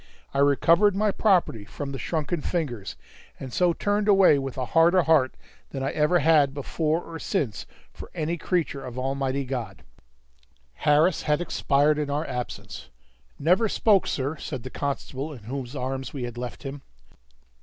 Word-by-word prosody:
I 140 - 0
recovered 165 +8 +4
my 210 +1 +2
property 180 - +2
from 140 +7 -6
the 135 - -5
shrunken 160 0 -2
fingers, 125 - -3 0.4
and 130 -2 -7
so 180 -1 +3
turned 205 +4 0
away 195 -8 +6
with 135 -1 -5
a 130 - -1
harder 170 +5 +4
heart 150 -6 +3 0.3
than 135 -1 -5
I 135 - -1
ever 150 +4 +2
had 150 -4 +3
before 155 +3 -1
or 165 -1 -8
since 140 - -2 0.3
for - - -10
any 160 +1 -1
creature 165 -5 -2
of 125 -1 -8
Almighty 135 +1 -1
God. 120 -8 -5 0.9
Harris 150 - +3
had 150 0 +1
expired 150 -3 +2
in 150 -1 -2
our 145 +3 -1
absence. 125 -1 -6 0.5
"Never 185 +8 +3
spoke, 205 -3 +3
sir," 140 +3 -2
said 130 -4 -6
the 130 - -7
constable 140 +1 -4
in 120 -6 -12
whose 130 +3 -6
arms 130 0 -4
we 130 - -4
had 120 -1 -5
left 125 +2 -6
him. 135 0 -6
145 Hz, 165 wpm, -25 LUFS, 130-165 Hz, 0.9 s, away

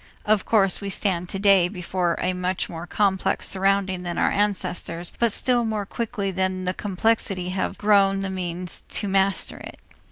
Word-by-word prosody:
Of 210 -2 +2
course, 195 -4 +2
we 200 - -4
stand 180 -3 0
today 195 -2 +4
before 180 -2 -2
a 185 - 0
much 180 0 -2
more 170 +1 -8
complex 195 -1 +1
surrounding 195 -1 +1
than 175 -1 -4
our - - +2
ancestors 185 -4 -1
but 235 -2 +3
still 245 +1 +1
more 215 -2 -2
quickly 210 -2 -3
than 185 0 -1
the 185 0 -1
complexity 195 -2 -1
have 185 +1 -2
grown 200 -2 +3
the 195 -1 -3
means 180 -1 -3
to 205 - -1
master 195 0 +1
it. - - -10
190 Hz, 165 wpm, -24 LUFS, 180-205 Hz, -, today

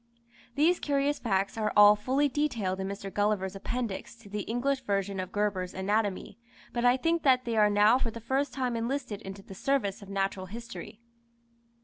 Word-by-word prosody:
These 330 +5 +3
curious 285 0 0
facts 195 -1 -1
are 215 -1 0
all 205 0 +9
fully 260 +7 +1
detailed 235 -10 -1
in 190 - -2
Mr. 195 0 -6
Gulliver's 205 -2 0
Appendix 230 +1 -4
to 230 -3 -16
the 210 +1 -3
English 260 +3 0
version 200 -4 -1
of 185 - -4
Gerber's 200 -3 -1
Anatomy, 205 +2 -1 0.3
but 240 - -1
I 245 +1 +5
think 330 +4 +1
that 255 -3 +3
they 230 -1 -1
are 210 -1 +5
now 210 +4 +5
for 235 - -1
the 230 - -7
first 265 +5 -1
time 255 -3 -2
enlisted 230 -2 -3
into 195 -1 -8
the 195 - -11
service 215 -2 -1
of 200 - -11
Natural 195 -1 -2
History. 230 0 -9
215 Hz, 180 wpm, -29 LUFS, 195-255 Hz, 0.3 s, all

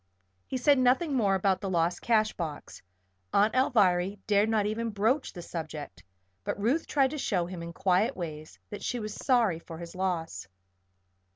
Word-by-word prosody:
He 260 - -2
said 280 +2 +4
nothing 260 +5 +3
more 205 -7 +2
about 190 -1 +1
the 195 - -3
lost 170 -1 0
cash 215 -2 +2
box 155 -4 -6 0.5
Aunt 210 +2 +4
Alviry 200 -7 +2
dared 210 +1 +3
not 215 -2 +2
even 225 +2 -1
broach 225 +7 0
the 175 - -9
subject 155 - -7 0.4
but - - -3
Ruth 245 +11 +1
tried 270 -3 +2
to 305 - -4
show 185 -9 0
him 175 -1 -7
in 170 0 -6
quiet 190 +8 +1
ways 155 -3 -7
that 205 - -6
she 245 - -2
was 215 -1 -5
sorry 230 -11 +2
for 165 -1 -10
his 170 0 -8
loss. 180 - -3
200 Hz, 175 wpm, -29 LUFS, 175-235 Hz, 0.5 s, said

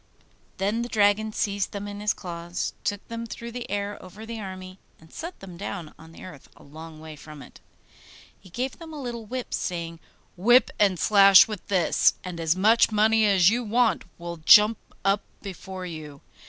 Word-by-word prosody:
Then 205 +4 -1
the 240 - -4
dragon 215 0 +2
seized 200 -2 -2
them 205 0 -5
in 205 0 -7
his 210 +1 +1
claws, 175 -1 -5
took 205 -1 -3
them 230 0 -6
through 235 +1 -8
the 245 0 -7
air 205 +1 -3
over 185 +4 -11
the 230 0 -6
army, 185 -1 -8 0.2
and 160 0 -19
set 340 +3 -7
them 185 -3 -10
down 180 -4 -6
on 160 +1 -14
the - - -13
earth 165 -7 -12
a - - -17
long 155 +2 -11
way 155 0 -10
from 150 -1 -12
it. - - -16 0.8
He 185 - -17
gave 255 - -4
them 325 -2 -10
a 300 - -7
little 235 -4 -6
whip, 255 +2 -5
saying, 170 -2 -4 0.4
'Whip 240 +8 +4
and 195 -3 +3
slash 195 0 +7
with 210 -5 -7
this, 185 -4 +2
and 180 -2 -7
as 165 0 +1
much 220 +5 +4
money 220 +1 +3
as 190 -1 +5
you 245 +2 -1
want 235 +1 +1
will 170 0 -7
jump 210 +7 +6 0.3
up 195 +1 +2 0.2
before 190 -1 -7
you. 155 -4 -9
200 Hz, 190 wpm, -25 LUFS, 175-220 Hz, 0.8 s, slash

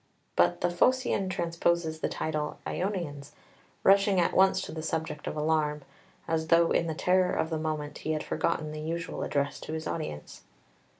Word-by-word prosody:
But 85 0 +3
the 175 - +2
Phocaean 225 0 +2
transposes 170 -2 0
the - - -1
title 155 -1 -2
"Ionians," 170 -8 -3 0.5
rushing 195 -1 +5
at 175 - +2
once 190 0 +5
to - - -6
the 160 - -5
subject 160 -1 -3
of - - -3
alarm, 150 -1 +1 0.4
as 160 -1 0
though 165 0 +5
in 170 - +2
the 160 - -2
terror 180 +2 +2
of 160 - -1
the 160 - -1
moment 155 -2 -3
he 155 - -2
had 155 - -2
forgotten 155 -2 -1
the 155 0 -6
usual 165 +2 -4
address 140 0 -1
to 155 - -7
his 160 0 -4
audience. 115 - -5
160 Hz, 175 wpm, -29 LUFS, 155-175 Hz, 0.5 s, rushing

